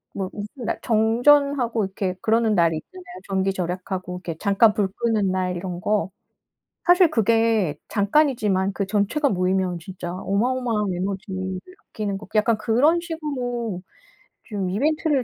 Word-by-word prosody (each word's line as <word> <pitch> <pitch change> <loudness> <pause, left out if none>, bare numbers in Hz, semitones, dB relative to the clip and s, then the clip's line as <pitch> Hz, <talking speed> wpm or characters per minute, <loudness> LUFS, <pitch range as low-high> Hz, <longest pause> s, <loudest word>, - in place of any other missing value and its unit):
뭐 190 -2 -3
무슨 210 +5 -7
날 - - -1
정전하고 240 +1 +3
이렇게 190 -1 -3
그러는 225 0 +2
날이 170 -3 +3
있잖아요. 365 - -11 0.2
전기 195 0 +1
절약하고 180 0 -4
이렇게 170 -3 -6
잠깐 210 +2 +4
불 205 -3 0
끄는 215 -3 0
날 185 -1 -1
이런 175 -1 -5
거. 205 -3 0 0.7
사실 355 -1 +6
그게 225 - +2
잠깐이지만 205 -4 +2
그 200 - -2
전체가 215 +9 +1
모이면 185 -2 0
진짜 175 0 -7
어마어마한 210 +2 0
에너지를 190 0 -4 0.3
아끼는 200 -2 -3
거 210 - -12
약간 215 +1 +3
그런 280 +11 +3
식으로 250 - -4 0.6
좀 200 -5 -3
이벤트를 290 - +1
210 Hz, 320 characters per minute, -23 LUFS, 190-240 Hz, 0.7 s, 사실